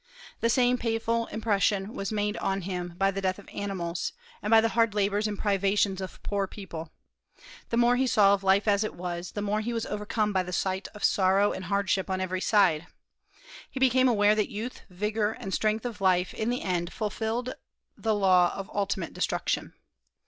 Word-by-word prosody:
The 230 - +1
same 250 0 +3
painful 230 0 0
impression 210 -1 0
was 195 +1 -4
made 210 0 -1
on 195 0 -1
him 175 -1 -4
by 195 +1 +2
the 195 0 -4
death 185 -1 0
of 205 - -14
animals, 180 -4 -3 0.3
and 210 - -3
by 225 0 +7
the 225 +1 +2
hard 230 -2 +2
labors 205 +1 +1
and 205 -1 -4
privations 200 -1 +1
of 190 - -8
poor 200 -1 -1
people. 170 -5 -8 0.8
The 230 - 0
more 240 +1 +4
he 260 +1 +2
saw 200 -4 +5
of 200 -1 -1
life 195 +2 +3
as 205 0 +3
it 215 - -4
was, 175 0 -5
the 205 - -3
more 210 +1 0
he 235 +2 -3
was 230 -1 -2
overcome 210 0 -1
by 190 - +2
the 180 0 -6
sight 190 +2 -1
of 210 - -9
sorrow 195 +1 +3
and 185 - -5
hardship 195 0 0
on 190 0 -1
every 185 0 -2
side. 180 -7 +3 0.8
He 265 - -6
became 260 0 +4
aware 205 -2 +4
that 215 -1 0
youth, 225 +5 -6
vigor, 210 +3 -1
and 195 -3 -6
strength 215 +2 0
of 225 -4 -5
life 185 -1 +2
in 220 - -2
the 245 +1 -2
end 175 -2 -1
fulfilled 225 +3 -2 0.4
the 220 -1 0
law 185 -3 +4
of 195 -1 -7
ultimate 195 -3 -1
destruction. - - -1
205 Hz, 195 wpm, -28 LUFS, 190-220 Hz, 0.8 s, by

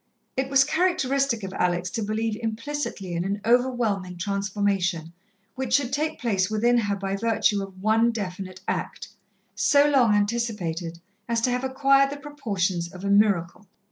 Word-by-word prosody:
It 265 0 -1
was 275 0 +5
characteristic 275 - +1
of 190 0 -5
Alex 180 0 0
to 230 - -3
believe 215 +1 -1
implicitly 230 -4 -4
in 170 0 -1
an 200 +2 -2
overwhelming 230 -7 +1
transformation 195 -3 -1 0.4
which 260 -2 0
should 265 -2 0
take 310 +2 -1
place 195 -5 0
within 235 +3 +2
her 205 -3 -1
by 195 0 -3
virtue 215 -1 +1
of 195 -1 -9
one 225 +2 +3
definite 185 -4 -5
act, - - -3 0.4
so 285 0 +4
long 250 -7 +4
anticipated 205 -6 -2 0.3
as 230 0 +1
to 250 - +1
have 250 +1 -1
acquired 275 +1 +3
the 285 - -6
proportions 200 - -2
of 185 +1 -9
a 200 - +1
miracle. 200 -2 +2
215 Hz, 155 wpm, -25 LUFS, 195-255 Hz, 0.4 s, was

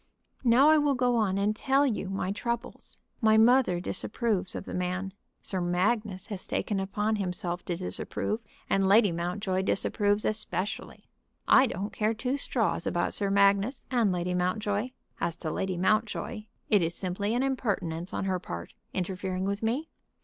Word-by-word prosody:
"Now 255 +4 +6
I 310 - +6
will 290 -2 +2
go 245 -1 +2
on 205 -4 +1
and 205 +2 +1
tell 275 +5 +3
you 215 -7 -1
my 195 -1 -2
troubles. 235 +4 -4 0.2
My 220 -1 +5
mother 230 -5 +5
disapproves 200 +1 -2
of - - -5
the - - -7
man. 180 +1 -2 0.3
Sir 190 -2 -2
Magnus 190 +3 0
has 200 -3 -5
taken 205 -2 -1
upon 210 +3 -1
himself 180 -2 -3
to 175 - -2
disapprove, 190 +4 -3 0.3
and 195 0 +2
Lady 205 0 +6
Mountjoy 185 +3 -1
disapproves 205 +2 +1
especially. 215 -1 -3 0.4
I 265 - +7
don't 200 -1 -4
care 215 +1 0
two 255 +5 -1
straws 225 -11 -1
about 175 - 0
Sir 200 -1 0
Magnus 200 +5 +3
and 235 -6 +3
Lady 180 0 -1
Mountjoy. 205 +5 0 0.3
As 170 -1 -1
to 155 - -4
Lady 190 +1 -2
Mountjoy, 215 +2 0 0.2
it 205 -3 +4
is 170 +1 -1
simply 200 +4 -2
an 250 - +1
impertinence 195 -10 -2
on - - -2
her 185 -1 0
part, - - -7 0.2
interfering 185 0 -2
with 200 +1 -2
me." 250 +8 -1
200 Hz, 165 wpm, -28 LUFS, 185-225 Hz, 0.4 s, I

